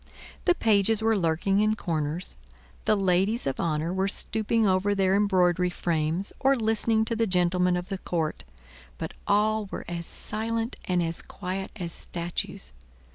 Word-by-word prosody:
The 355 Hz, -, +4 dB
pages 220 Hz, -, +3 dB
were 225 Hz, 0 st, +3 dB
lurking 185 Hz, +2 st, +1 dB
in 215 Hz, +1 st, +3 dB
corners, 160 Hz, -3 st, -2 dB, 0.5 s
the 215 Hz, -, +4 dB
ladies 195 Hz, +3 st, +1 dB
of 135 Hz, -, -2 dB
honor 160 Hz, +1 st, 0 dB
were 190 Hz, +1 st, +1 dB
stooping 220 Hz, +2 st, 0 dB
over 195 Hz, +1 st, +2 dB
their 195 Hz, -1 st, +3 dB
embroidery 180 Hz, -3 st, +3 dB
frames 170 Hz, +1 st, -1 dB
or 275 Hz, +1 st, +4 dB
listening 220 Hz, -1 st, +2 dB
to 230 Hz, -, -1 dB
the 225 Hz, 0 st, +1 dB
gentlemen 180 Hz, -1 st, +2 dB
of 180 Hz, +1 st, -5 dB
the 195 Hz, -2 st, -3 dB
court; 165 Hz, -4 st, -2 dB, 0.5 s
but -, -, -5 dB
all 210 Hz, +1 st, +2 dB
were -, -, -6 dB
as 170 Hz, -1 st, -4 dB
silent 225 Hz, +2 st, -2 dB
and 180 Hz, -1 st, +1 dB
as 165 Hz, 0 st, -2 dB
quiet 190 Hz, 0 st, -5 dB
as 175 Hz, -5 st, -5 dB
statues. 170 Hz, 0 st, -4 dB
190 Hz, 155 wpm, -27 LUFS, 175-215 Hz, 0.5 s, The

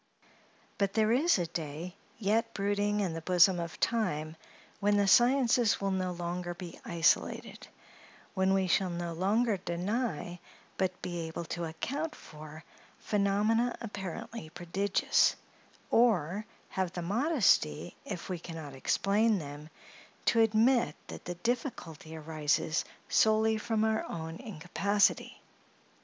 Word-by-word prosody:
But 200 Hz, -1 st, +1 dB
there 220 Hz, 0 st, +3 dB
is 295 Hz, +6 st, +4 dB
a 175 Hz, -, 0 dB
day 165 Hz, +2 st, -5 dB, 0.2 s
yet 225 Hz, +2 st, 0 dB
brooding 205 Hz, +1 st, 0 dB
in 185 Hz, -5 st, -1 dB
the 165 Hz, -, -5 dB
bosom 180 Hz, +1 st, +4 dB
of 170 Hz, -1 st, -5 dB
time, 160 Hz, -9 st, 0 dB, 0.4 s
when 205 Hz, 0 st, +3 dB
the 200 Hz, -, +3 dB
sciences 240 Hz, 0 st, +4 dB
will 195 Hz, 0 st, -1 dB
be 190 Hz, -, 0 dB
no 185 Hz, -1 st, -1 dB
longer 175 Hz, 0 st, -4 dB, 0.3 s
isolated; 165 Hz, -2 st, 0 dB, 0.7 s
when 190 Hz, 0 st, +2 dB
we 190 Hz, -1 st, +2 dB
shall 185 Hz, +1 st, +2 dB
no 170 Hz, -1 st, -4 dB
longer 205 Hz, +5 st, +1 dB
deny, 180 Hz, 0 st, -3 dB, 0.4 s
but 185 Hz, -1 st, -2 dB
be 175 Hz, -2 st, -3 dB
able 165 Hz, +1 st, -5 dB
to 170 Hz, -1 st, -3 dB
account 280 Hz, -, -4 dB
for, 155 Hz, 0 st, -11 dB, 0.3 s
phenomena 210 Hz, +4 st, +1 dB
apparently 205 Hz, -3 st, -6 dB
prodigious, 175 Hz, +4 st, +1 dB, 0.6 s
or 210 Hz, -4 st, +2 dB, 0.2 s
have 185 Hz, -2 st, -2 dB
the 175 Hz, -, -4 dB
modesty, 200 Hz, -, +2 dB
if 185 Hz, -4 st, -6 dB
we 180 Hz, -2 st, -3 dB
can 165 Hz, 0 st, -8 dB
not 150 Hz, -4 st, -7 dB
explain 205 Hz, -, +2 dB
them, 145 Hz, -1 st, -8 dB, 0.6 s
to 230 Hz, -, +3 dB
admit 225 Hz, -, +3 dB
that -, -, -9 dB
the 175 Hz, -, -4 dB
difficulty 175 Hz, -, -4 dB
arises 155 Hz, 0 st, 0 dB, 0.2 s
solely 220 Hz, 0 st, +3 dB
from 220 Hz, 0 st, -1 dB
our 220 Hz, 0 st, +1 dB
own 160 Hz, 0 st, -5 dB
incapacity. 200 Hz, 0 st, 0 dB
190 Hz, 130 wpm, -31 LUFS, 170-220 Hz, 0.7 s, is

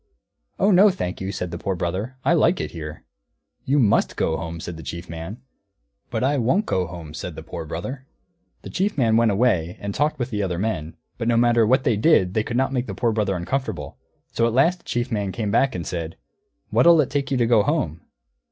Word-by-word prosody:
"Oh 200 Hz, -, +3 dB
no, 195 Hz, +3 st, +7 dB
thank 95 Hz, -, -4 dB
you," 95 Hz, +1 st, -3 dB
said 90 Hz, -3 st, -4 dB
the 85 Hz, -, -5 dB
Poor 95 Hz, -2 st, -2 dB
Brother, 95 Hz, +9 st, -3 dB
"I -, -, +4 dB
like 170 Hz, +2 st, +3 dB
it -, -, -3 dB
here." 75 Hz, -2 st, -8 dB, 0.6 s
"You 140 Hz, +3 st, +2 dB
must 115 Hz, -8 st, +3 dB
go 80 Hz, -, 0 dB
home," 85 Hz, 0 st, -5 dB
said 85 Hz, 0 st, -6 dB
the 80 Hz, -, -9 dB
Chief 85 Hz, +2 st, -7 dB
Man. 85 Hz, +9 st, -7 dB, 0.7 s
"But -, -, -2 dB
I 140 Hz, +1 st, +2 dB
won't 150 Hz, -, +2 dB
go 90 Hz, -, 0 dB
home," 85 Hz, -3 st, -9 dB
said -, -, -6 dB
the -, -, -8 dB
Poor -, -, -6 dB
Brother. 130 Hz, -, -6 dB, 0.6 s
The -, -, -8 dB
Chief 200 Hz, -1 st, -1 dB
Man 115 Hz, -5 st, +3 dB
went 115 Hz, 0 st, +4 dB
away 95 Hz, -6 st, +1 dB
and 100 Hz, 0 st, -4 dB
talked 150 Hz, +6 st, 0 dB
with 125 Hz, 0 st, -3 dB
the 105 Hz, -2 st, -1 dB
other 90 Hz, -3 st, -1 dB
men; 85 Hz, -6 st, -2 dB, 0.2 s
but 115 Hz, -, -2 dB
no 120 Hz, -1 st, +3 dB
matter 120 Hz, -1 st, +4 dB
what 130 Hz, +2 st, +3 dB
they 115 Hz, -4 st, +2 dB
did 100 Hz, -, +3 dB
they 110 Hz, -, +2 dB
could 120 Hz, +2 st, -3 dB
not 135 Hz, +1 st, +1 dB
make 125 Hz, -1 st, -1 dB
the 100 Hz, -, -5 dB
Poor 115 Hz, +2 st, +1 dB
Brother 105 Hz, -3 st, 0 dB
uncomfortable; 130 Hz, +10 st, -3 dB, 0.3 s
so 115 Hz, -, +2 dB
at 115 Hz, -, -1 dB
last 165 Hz, +8 st, +3 dB
the -, -, -29 dB
Chief 120 Hz, +1 st, -2 dB
Man 100 Hz, -3 st, -1 dB
came 105 Hz, -1 st, -2 dB
back 135 Hz, +3 st, +2 dB
and 85 Hz, -2 st, -4 dB
said, 85 Hz, -2 st, -4 dB, 0.6 s
"What'll 170 Hz, -1 st, +6 dB
you 150 Hz, -, +4 dB
take 140 Hz, +1 st, -2 dB
to 125 Hz, -3 st, +1 dB
go 115 Hz, -2 st, +4 dB
home?" 95 Hz, -, -1 dB
110 Hz, 225 wpm, -23 LUFS, 90-130 Hz, 0.7 s, no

